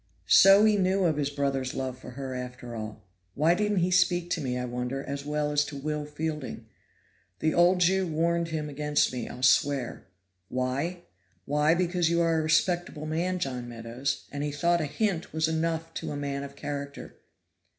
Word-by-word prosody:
So 195 - +7
he 215 -1 +4
knew 190 0 +2
of 160 -4 +2
his 145 -1 0
brother's 140 -2 -1
love 130 -1 -3
for 130 - -11
her, 135 -1 -4
after 125 -1 -6
all. 110 -1 -7 0.3
Why 160 +4 +4
didn't 210 0 +1
he 180 +2 +1
speak 175 -1 +2
to 165 - 0
me, 125 -3 -2
I 125 - -2
wonder, 125 +2 -3
as 140 0 -5
well 150 0 0
as 145 0 +3
to 145 - -7
Will 150 +1 -3
Fielding? 150 -6 -4 0.7
The 155 - +1
old 180 +1 +4
Jew 190 +1 +3
warned 170 +1 0
him 155 -2 -3
against 150 -1 +1
me, 125 -2 -4
I'll 125 +1 -8
swear. 130 -1 +2 0.4
Why? 135 +8 -2 0.4
why 150 +3 +3
because 175 -1 +1
you 170 0 +2
are 165 -1 +2
a - - +1
respectable 160 0 +1
man, 170 +4 -1
John 125 -7 -3
Meadows, 120 +3 -4
and 145 0 -3
he 150 - -2
thought 170 +4 +2
a - - 0
hint 175 +3 -1
was 160 0 +1
enough 165 0 -1
to - - -4
a 145 - -4
man 140 -1 -3
of 140 0 -8
character. 140 0 -6
150 Hz, 190 wpm, -28 LUFS, 135-170 Hz, 0.7 s, So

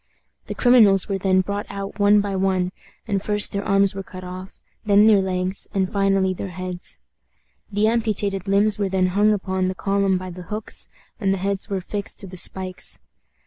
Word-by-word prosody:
The - - -5
criminals 220 -6 +5
were 195 -2 -2
then 185 0 +2
brought 200 +2 -4
out 200 +1 -7
one 205 0 +5
by 200 -1 -3
one, 185 -1 0 0.4
and 195 -1 -1
first 210 0 +3
their 200 0 -3
arms 195 -1 +2
were 195 - -5
cut 190 -2 -10
off, 185 +1 -9 0.2
then 205 -1 +5
their 210 -3 +5
legs, 185 0 -1
and 190 -1 0
finally 195 -1 +1
their 190 - -6
heads. 185 0 -3 0.7
The 205 +1 +1
amputated 210 -4 -1
limbs 200 +1 +2
were 200 -2 0
then 185 -1 +1
hung 205 +3 +3
up 205 -3 -1
upon 185 -1 -1
the 185 - -3
column 195 -1 0
by 185 0 -7
the 180 +1 -9
hooks, 210 0 -2 0.3
and 195 -3 0
the 195 - 0
heads 195 +2 -3
were 195 -2 -2
fixed 205 +2 -5
to - - -8
the 185 -1 -10
spikes. 185 0 +2
195 Hz, 195 wpm, -22 LUFS, 185-205 Hz, 0.7 s, criminals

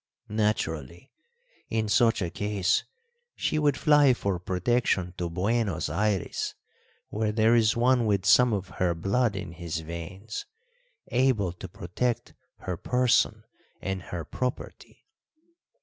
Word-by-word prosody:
Naturally, 105 - -2 0.6
in 110 -1 0
such 115 -2 +3
a 85 - -3
case, 105 -1 0 0.5
she 155 - 0
would 145 -2 +2
fly 145 -4 +5
for 100 -6 -2
protection 95 0 0
to 85 -1 -2
Buenos 100 0 0
Ayres, 100 +3 -1 0.5
where 110 0 -1
there 110 +1 +3
is 115 -1 +3
one 120 -1 +3
with 100 -2 +1
some 125 +4 +6
of 95 -3 -2
her 90 -2 +2
blood 100 +6 +1
in 90 -3 -5
his 85 -1 -5
veins 90 +7 -7 0.6
able 120 -8 +2
to 90 +2 -9
protect 100 +8 -3 0.3
her 90 -2 -4
person 125 +5 +2 0.4
and 95 0 -3
her 85 -2 -6
property." 125 +8 -5
105 Hz, 125 wpm, -27 LUFS, 90-120 Hz, 0.6 s, some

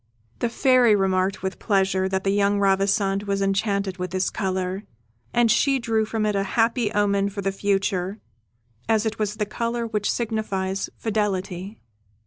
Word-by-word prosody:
The 240 - 0
Fairy 250 -2 +4
remarked 190 0 0
with 190 0 -3
pleasure 190 -2 +1
that 190 0 -1
the 195 - +1
young 200 0 +2
Ravissante 195 0 +1
was 200 0 0
enchanted 195 -1 0
with 180 0 -3
this 185 +1 -1
colour, 190 -1 -2 0.5
and 235 -2 +3
she 275 +3 +3
drew 225 -3 0
from 220 0 -2
it 210 -1 0
a 195 - +2 0.2
happy 230 0 +2
omen 200 -1 +1
for 200 0 -5
the 195 - 0
future, 195 -1 -1 0.7
as 220 -1 +2
it 220 0 -2
was 210 -1 -1
the 210 - -1
colour 235 +3 -2
which 210 -2 -1
signifies 200 -4 -2
fidelity. 200 -2 -2
200 Hz, 160 wpm, -24 LUFS, 195-220 Hz, 0.7 s, Fairy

